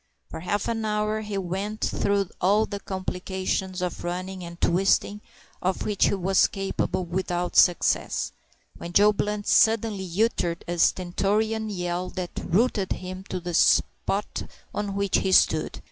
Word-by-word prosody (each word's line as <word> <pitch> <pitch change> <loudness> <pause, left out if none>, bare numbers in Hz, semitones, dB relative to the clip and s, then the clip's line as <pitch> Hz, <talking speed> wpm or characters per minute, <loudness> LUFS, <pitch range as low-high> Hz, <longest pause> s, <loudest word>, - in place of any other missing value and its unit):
For - - -6
half 195 +4 -2
an 225 -1 -1
hour 215 0 0
he 210 -2 -4
went 195 +3 -3
through 200 -2 0
all 205 +4 +4
the 200 - -5
complications 190 -1 -3
of 180 - -4
running 185 +1 -4
and 170 0 -9
twisting 195 +3 +2 0.4
of 185 +1 -1
which 210 -2 +2
he - - +1
was 190 0 +3
capable, 190 -1 -2
without 175 0 -2
success, 175 -2 +3 0.5
when 170 0 -7
Joe 210 +2 +6
Blunt 210 0 -2
suddenly 220 -4 +3
uttered 175 -7 -1
a 175 0 -3
stentorian 210 +6 +1
yell 180 -2 -3
that 180 -1 -5
rooted 205 0 +1
him 185 +1 -7
to 185 - -4
the 175 0 -5
spot 65 - +1 0.2
on 205 -1 -3
which 200 -1 +1
he 190 - -1
stood. - - +3
190 Hz, 145 wpm, -25 LUFS, 180-205 Hz, 0.5 s, Joe